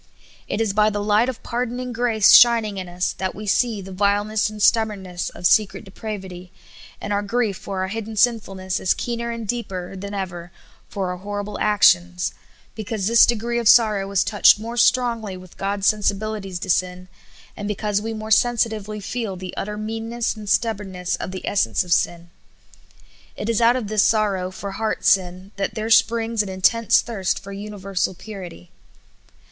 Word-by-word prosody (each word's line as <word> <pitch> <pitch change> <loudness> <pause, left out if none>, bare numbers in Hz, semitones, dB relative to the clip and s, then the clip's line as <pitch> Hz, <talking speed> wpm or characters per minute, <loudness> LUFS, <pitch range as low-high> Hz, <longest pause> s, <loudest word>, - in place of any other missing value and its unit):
It 205 - -3
is 220 -3 0
by 210 +1 +4
the 205 -1 -3
light 210 +4 +3
of 255 - -7
pardoning 245 +1 -3
grace 225 -3 +3
shining 230 -4 +6
in 185 -2 -5
us 180 +1 -2
that 190 0 -2
we 215 - -7
see 220 0 +1
the 190 0 -10
vileness 205 +2 +1
and 215 0 -9
stubbornness 200 -5 +1
of - - -9
secret 210 +3 +3
depravity; 190 -3 -8 0.5
and 205 - -3
our 205 - +1
grief 215 0 -1
for 190 0 -5
our 190 - -3
hidden 220 +1 -5
sinfulness 195 -5 0
is 185 - +1
keener 235 0 -3
and 230 -2 -5
deeper 195 -6 -4
than 200 +2 -6
ever 175 -3 -5 0.4
for 190 -2 -3
our 180 - -5
horrible 205 +2 -5
actions, 180 -4 +3 0.4
because 215 -2 -4
this 230 +2 +6
degree 235 +1 -1
of 230 -3 +3
sorrow 215 -4 +4
is 200 -2 +2
touched 205 0 +5
more 230 +2 -6
strongly 235 -5 +1
with 185 -1 -14
God's 200 0 -2
sensibili 215 0 -2
ties 190 -2 -6
to 185 - -7
sin, 180 +1 -1 0.5
and 205 - -5
because 210 0 -1
we 225 +1 -4
more 220 0 -6
sensitively 220 -2 +1
feel 210 0 -4
the 185 0 -8
ut - - -4
ter 210 0 -5
meanness 225 +2 -3
and 210 -2 -8
stubbornness 195 -6 -1
of - - -5
the 185 0 -7
essence 115 - +1
of 175 -1 0
sin. 170 -1 -1 1.1
It 210 - -4
is 230 0 +1
out 235 +1 +5
of 250 -4 -2
this 215 0 +2
sorrow 200 -4 +1
for 195 +1 -7
heart 220 +2 -3
sin 185 +1 +1
that 195 - -2
there 220 0 -3
springs 230 0 +3
an 205 - -4
intense 200 +5 +3
thirst 200 -6 -2
for 200 - -9
universal 195 -2 -3
purity. 180 - -10
205 Hz, 180 wpm, -22 LUFS, 190-225 Hz, 1.1 s, shining